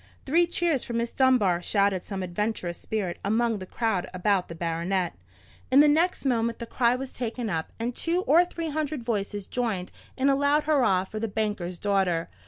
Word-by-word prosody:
"Three 340 +5 +3
cheers 335 -5 0
for 235 - -6
Miss 235 0 -1
Dunbar!" 225 -10 +3
shouted 200 -1 +1
some 195 -2 -5
adventurous 180 -1 -3
spirit 200 -5 -3
among 225 +1 +1
the 185 - -8
crowd 220 -6 -1
about 185 0 +1
the 170 - -8
baronet. 170 +2 -1 0.6
In 270 - +6
the 300 - +7
next 320 +2 +2
moment 235 -3 +1
the 235 - -6
cry 235 +1 +2
was 260 +1 -6
taken 235 -2 -3
up, 160 -1 -3
and 235 +1 -2
two 340 +2 0
or 335 +2 +5
three 335 -2 -5
hundred 300 -3 -3
voices 205 -3 -2
joined 215 -7 -2 0.3
in 265 - +2
a 275 - +4
loud 285 +2 +2
hurrah 250 -12 +3
for 215 +3 -7
the 225 - -1
banker's 205 -4 -2
daughter. 190 -4 0
225 Hz, 190 wpm, -26 LUFS, 190-270 Hz, 0.6 s, the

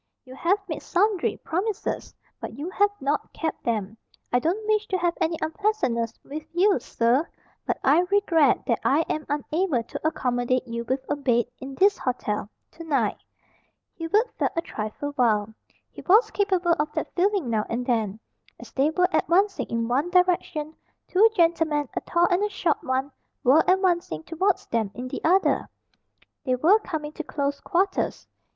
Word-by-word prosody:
You 255 - -11
have 340 +9 +1
made 315 - -4
sundry 400 +1 +1
promises, 390 +5 -3 0.2
but 225 - -7
you 315 +6 -5
have 410 +2 +3
not 285 +2 -1
kept 320 -2 -3
them. 215 -3 -2 0.4
I 245 - +5
don't 360 - -1
wish 430 0 +1
to 375 - 0
have 345 -1 +1
any 330 0 +1
unpleasantness 315 - -1
with 300 +2 -6
you, 380 -1 +3
sir, 245 +7 +1 0.4
but - - 0
I 285 +5 +5
regret 335 -9 +3
that 235 - +1
I 290 +4 +3
am 310 -1 -3
unable 295 -2 0
to 275 - -4
accommodate 250 -3 0
you 235 0 -4
with 260 +3 -1
a 290 - 0
bed, 245 -5 +1
in 265 +1 -8
this 400 +6 +3
hotel, 210 -5 -2 0.2
to 330 - -10
night." 275 -10 0 0.8
Hubert 415 +9 0
felt - - +1
a 335 - +1
trifle 220 +6 -5
wild. 220 -3 +2 0.4
He - - -10
was 425 +6 +4
capable 375 -4 +2
of 300 0 0
that - - -3
feeling 370 - +1
now 215 -2 0
and 245 +2 -2
then. 220 -4 0 0.4
As - - -12
they 275 +3 +2
were 360 +3 +2
advancing 365 - +2
in 230 0 -2
one 275 +8 0
direction, 350 -4 +1 0.3
two 420 +5 +5
gentlemen, 325 - +2
a - - -2
tall 345 0 +2
and 355 +3 +2
a 420 - +1
short 345 -6 -1
one, 265 +2 -1 0.3
were 275 +6 +5
advancing 350 - +1
towards 370 - 0
them 225 -3 -1
in 250 +2 -5
the - - -6
other. 375 +4 +2 0.7
They 255 -3 +1
were 345 - +4
coming 310 -7 -5
to 320 - -6
close 280 -2 -2
quarters. 380 +1 -1
310 Hz, 170 wpm, -25 LUFS, 250-365 Hz, 0.8 s, I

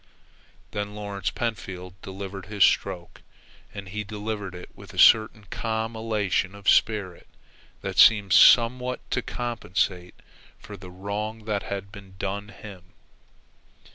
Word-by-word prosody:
Then 105 0 -4
Lawrence 100 -3 -3
Pentfield 95 -6 -5
delivered 95 -1 -7
his 105 -2 +2
stroke, 90 -3 0 0.5
and 100 -2 -8
he 105 +3 -4
delivered 105 -2 -5
it 90 - -10
with - - -13
a - - -12
certain 110 -1 +5
calm 110 0 -2
elation 105 -3 -1
of 100 0 -12
spirit 100 -5 +2 0.5
that - - -3
seemed 100 -4 +6
somewhat 125 +1 +5
to - - 0
compensate 95 -7 -3 0.4
for 105 - -11
the 90 -1 -11
wrong 105 +4 -5
that 105 -2 -1
had 100 -1 -6
been 100 -2 -13
done 100 +2 -4
him. 95 -4 -13
100 Hz, 130 wpm, -25 LUFS, 95-110 Hz, 0.5 s, seemed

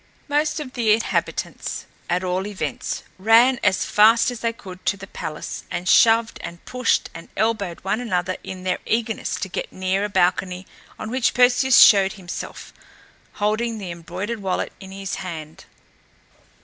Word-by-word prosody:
Most 300 +2 +1
of 270 -4 -7
the 225 -4 +3
inhabitants, 225 +1 -2 0.2
at 180 +1 0
all 185 +2 -1
events, 205 -2 -4 0.2
ran 230 +5 +5
as 195 -2 +2
fast 225 +3 +5
as 245 - -7
they 230 0 0
could 185 -5 -12
to 200 - +2
the 195 - -9
palace 155 -5 -6
and 175 +1 -4
shoved 225 +3 +4
and 170 0 -9
pushed 250 -2 0
and 165 - -10
elbowed 210 -5 -1
one 210 +5 -1
another 185 -5 -1
in 185 -1 -7
their 185 -1 -1
eagerness 225 -1 -1
to - - -3
get 185 - -5
near 185 +1 -1
a 210 - -1
balcony 185 0 +1 0.3
on 220 - -6
which 255 -1 +1
Perseus 250 +1 +5
showed 195 -2 +7
himself, 180 -4 -8 0.6
holding 220 +2 -1
the 190 -4 -6
embroidered 180 +7 -5
wallet 190 -2 -2
in 190 -1 -11
his 195 0 -5
hand. 160 -4 -8
200 Hz, 160 wpm, -22 LUFS, 185-230 Hz, 0.6 s, showed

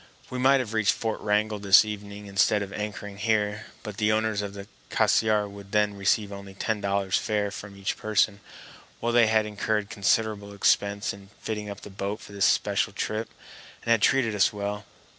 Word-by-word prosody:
We 125 - -3
might 135 +2 +5
have 115 -4 -4
reached 110 -3 +3
Fort 110 -1 -3
Wrangell 105 0 0
this 100 +1 +7
evening 105 -1 -7
instead 100 +1 +2
of 100 0 -8
anchoring 105 -1 -5
here; 105 -1 0 0.2
but 105 -2 -7
the 105 0 +2
owners 110 -1 +1
of 100 -1 -6
the 100 0 -8 0.2
Cassiar 105 -2 +2
would 100 -1 -12
then 105 -1 +3
receive 100 +1 +1
only 100 -1 -9
ten 110 +1 -2
dollars 100 -1 +1
fare 105 -1 -1
from 100 0 -9
each 100 0 -2
person, 105 -1 +1 0.6
while 120 0 -1
they 120 -2 +6
had 110 -1 +3
incurred 105 0 -2
considerable 100 0 0
expense 100 0 +1
in 100 0 -13
fitting 105 -1 -4
up 100 0 -7
the 105 - -10
boat 100 +2 -4
for - - -13
this 100 -1 +1
special 100 +1 +2
trip, 110 +2 -3 0.5
and 115 - 0
had 115 -2 +4
treated 130 -4 +3
us 100 -2 +3
well. 105 0 -4
105 Hz, 190 wpm, -26 LUFS, 100-110 Hz, 0.6 s, this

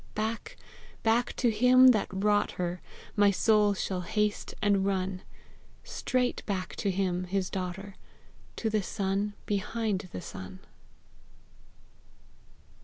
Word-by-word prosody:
Back, 220 +1 -3 0.5
back 230 +2 +2
to 240 -2 +2
him 250 +4 +7
that 220 -5 +3
wrought 205 +2 +1
her 180 0 -3 0.3
My 205 -1 +5
soul 210 +1 +3
shall 185 -1 -2
haste 210 +3 -1
and 200 -2 +2
run; 190 -1 -1 0.6
Straight 250 -1 -1
back 190 -3 -3
to 200 - 0
him, 185 -1 0
his 190 0 -2
daughter, 195 +2 -4 0.6
To 220 - -2
the 215 -1 +2
sun 200 +1 -2
behind 205 -1 -2
the - - -5
sun. 95 0 -9
200 Hz, 115 wpm, -29 LUFS, 185-215 Hz, 0.6 s, him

